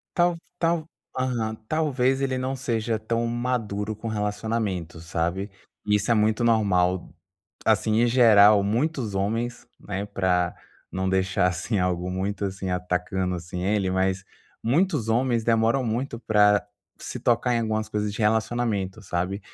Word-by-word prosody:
Talv 175 -1 +3 0.2
tal 165 -1 +1 0.3
aham, 120 -4 -1
talvez 135 -3 +1
ele 130 -1 0
não 130 +1 -2
seja 115 -3 -1
tão 115 +2 -1
maduro 115 -3 -2
com 110 +2 -7
relacionamento, 105 -5 -2
sabe, 85 +4 -2 0.4
isso 105 +2 +1
é - - +6
muito 110 +1 +2
normal, 95 -6 +2 0.6
assim, 110 0 +3
em - - +4
geral 110 -4 +6
muitos 120 +1 -1
homens, 115 +5 -2
né, 100 0 -4
para 90 -3 0 0.4
não 95 0 -2
deixar 95 0 +1
assim 100 +4 -2
algo 90 0 -1
muito, 100 +2 -2
assim, 95 -1 -3
atacando, 90 +1 -1
assim, 85 +1 -6
ele, 100 0 +1
mas 95 0 0 0.4
muitos 145 - +1
homens 120 -1 +1
demoram 115 +3 +2
muito 120 +2 -2
para 105 -2 +3 0.3
se - - -6
tocar 120 +1 +2
em 115 - +1
algumas 110 -1 -1
coisas 105 -1 -2
de - - -8
relacionamento, 110 -2 0
sabe, 90 +2 -2
110 Hz, 140 wpm, -25 LUFS, 95-120 Hz, 0.6 s, é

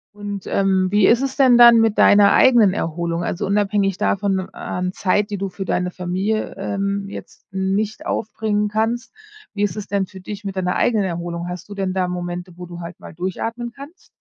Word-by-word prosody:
Und, 205 -2 -6
ähm, 190 -1 +2
wie 205 -1 +4
ist 240 +3 +4
es 270 -1 -2
denn 255 -3 +6
dann 235 -1 +9
mit 225 -2 +2
deiner 205 0 +6
eigenen 230 -7 +5
Erholung? 170 0 -2
Also, 175 - -2
unabhängig 200 -1 +1
davon 195 -1 0
an 180 0 -4
Zeit, 205 +2 0
die 205 - -3
du 195 0 -3
für 190 +1 -6
deine 180 0 -1
Familie, 190 +5 -2
ähm, 200 0 -2
jetzt - - -11
nicht 195 +3 -1
aufbringen 210 -1 -1
kannst, 225 +2 -2 0.4
wie 205 - -4
ist 190 -4 -1
es 210 - -5
denn 195 -2 -1
für 190 - -12
dich 205 +2 -8
mit 195 -1 -5
deiner 180 -1 -1
eigenen 215 -5 +2
Erholung? 170 0 -4
Hast 180 +2 -7
du 200 - -8
denn 190 -2 -2
da 185 -1 0
Momente, 175 0 -5
wo 180 - -7
du 175 0 -9
halt 170 0 -8
mal - - -11
durchatmen 225 +7 -4
kannst? 280 - -13
195 Hz, 200 wpm, -20 LUFS, 180-210 Hz, 0.4 s, dann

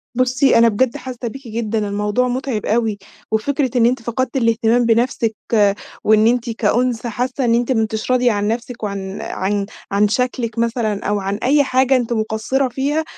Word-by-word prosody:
بصّي 255 +1 +3
أنا 230 0 +6
بجد 235 +3 0
حاسّة 250 -2 -6
بيكِ 270 +3 -8
جدًا؛ 225 -1 -3
الموضوع 210 +3 0
متعِب 250 -3 -2
أوي، 220 -1 0 0.3
وفكرة 260 +3 0
إن 235 - +4
أنتِ 245 +1 +1
فقدتِ 240 +3 -2
الاهتمام 230 0 +2
بنفسِك، 230 -1 +1 0.7
وإن 215 0 +4
أنتِ 240 0 +1
كأنثى 235 +2 0
حاسّة 250 +3 -2
إن 230 - +3
أنتِ 240 +2 0
ما 225 -3 +2
أنتيش 220 +2 -2
راضية 250 -1 +3
عن 205 0 -1
نفسِك 235 +1 -4
وعن 195 -1 -4
عن 200 +1 -2 0.3
عن 200 +1 +3
شكلِك 235 0 -1
مثلًا 230 -3 -1
أو 205 0 0
عن 195 +1 -2
أي 285 +3 +4
حاجة 260 0 +2
أنتِ 245 -2 0
مقصّرة 220 +5 0
فيها، 280 +5 -1
235 Hz, 175 wpm, -19 LUFS, 215-255 Hz, 0.7 s, أنا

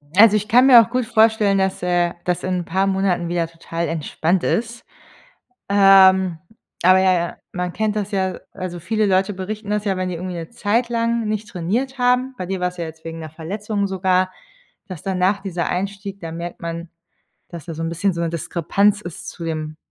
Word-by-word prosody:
Also, 210 +1 +7
ich 210 0 -4
kann 250 +4 +5
mir 245 -3 +10
auch 230 - -2
gut 250 0 -1
vorstellen, 220 -3 +3
dass, 190 0 0
äh, 175 -1 +1
das 180 -1 -1
in 185 0 -1
ein 175 - -5
paar 190 +4 0
Monaten 190 -3 0
wieder 170 -1 -1
total 165 0 -5
entspannt 165 +2 -1
ist. 235 +1 -2 0.8
Ähm, 190 -3 +6 0.4
aber 185 +1 +6
ja, 190 0 +4
ja, 170 -1 -2
man 180 -1 -3
kennt 215 -1 -1
das 205 -1 -3
ja 190 -2 -1
also, 175 -1 -6
viele 215 +6 0
Leute 195 +1 +2
berichten 205 +3 -6
das 210 0 -1
ja, 195 -2 +1
wenn 185 0 -2
die 180 - -4
irgendwie 180 +1 -5
'ne 165 -1 -6
Zeit 235 +2 0
lang 230 -1 0
nicht 215 0 -3
trainiert 230 +10 -2
haben, 250 +1 +2
bei 185 - -4
dir 190 +1 -3
war 180 0 0
es 180 - -16
ja 170 - -3
jetzt 160 0 -10
wegen 165 0 -6
'ner 160 -1 -7
Verletzung 200 +6 -3
sogar, 185 -1 +1 0.6
dass 185 -6 -8
danach 190 +1 +1
dieser 180 -3 -3
Einstieg 200 +1 -4
da 165 -3 -7
merkt 170 +1 -7
man, 170 0 -5 0.6
dass 170 -3 -9
da 165 - -6
so 160 - -5
'n 165 - -1
bisschen 175 +4 0
so 170 - -4
'ne 170 - 0
Diskrepanz 170 +5 +1
ist 175 -5 -9
zu 170 - -7
dem 155 -1 -4
190 Hz, 210 wpm, -21 LUFS, 170-210 Hz, 0.8 s, mir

